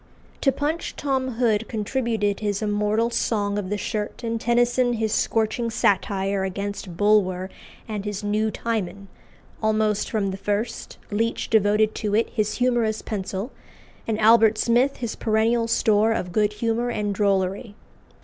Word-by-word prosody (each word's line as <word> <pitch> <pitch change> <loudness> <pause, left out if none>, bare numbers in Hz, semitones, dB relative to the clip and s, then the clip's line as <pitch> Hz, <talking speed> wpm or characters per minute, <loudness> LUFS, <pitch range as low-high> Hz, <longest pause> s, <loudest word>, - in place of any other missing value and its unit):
To 270 - +4
Punch 295 +5 -3
Tom 265 -2 -1
Hood 225 -2 +1
contributed 220 -2 -1
his 205 0 -2
immortal 210 +2 +1
"Song 205 -3 0
of 185 -2 -5
the 210 - -1
Shirt," 210 +3 -4
and 230 -1 -2
Tennyson 240 +1 +2
his 220 -2 -1
scorching 225 +1 0
satire 195 -2 +1
against 195 -2 -4
Bulwer 190 -3 +2 0.4
and 210 -3 -4
his 205 0 -4
"New 210 +1 +1
Timon;" 200 -4 -3 0.5
almost 215 -1 +1
from 200 -3 -1
the 190 - -5
first, 210 +4 -3
Leech 225 +3 -1
devoted 215 0 +3
to 210 -1 -2
it 225 - +1
his 215 -2 -1
humorous 240 -3 +1
pencil, 200 +3 -4 0.6
and 220 -1 -1
Albert 220 0 +5
Smith 245 +5 +2
his 235 -3 -4
perennial 225 +1 +1
store 220 -1 +3
of 180 -5 -3
good 210 +2 +1
humour 230 +3 -1
and 210 -3 -1
drollery. 200 +1 0
215 Hz, 145 wpm, -24 LUFS, 205-230 Hz, 0.6 s, Albert